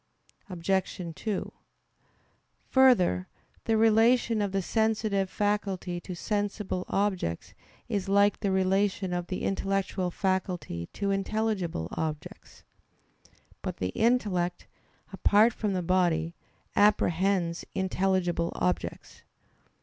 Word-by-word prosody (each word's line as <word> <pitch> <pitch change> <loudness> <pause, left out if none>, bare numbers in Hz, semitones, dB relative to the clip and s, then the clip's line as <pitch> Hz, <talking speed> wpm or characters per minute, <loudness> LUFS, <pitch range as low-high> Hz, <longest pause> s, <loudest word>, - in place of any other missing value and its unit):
Obj. 185 +1 -1
2: 215 -4 -3 1.2
Further, 205 - +4 0.4
the 225 -1 +2
relation 225 +1 +4
of 200 -2 -1
the 195 -1 -1
sensitive 215 -2 0
faculty 195 -4 -1
to 180 +1 -7
sensible 205 -1 -2
objects 190 - -1 0.3
is 200 -4 -2
like 200 +1 +4
the 200 - -1
relation 190 0 +1
of 175 0 -2
the 185 - -4
intellectual 195 -1 -1
faculty 180 - -2
to 200 -1 -1
intelligible 195 - -1
objects. 155 -2 -6 1.0
But - - -4
the 90 - -2
intellect, 195 - 0 0.5
apart 210 +4 +4
from 210 -3 -2
the 180 -1 -1
body, 170 -2 +1 0.4
apprehends 190 -3 +2
intelligible 185 -2 0
objects. 90 -1 -3
190 Hz, 100 wpm, -28 LUFS, 175-205 Hz, 1.2 s, Further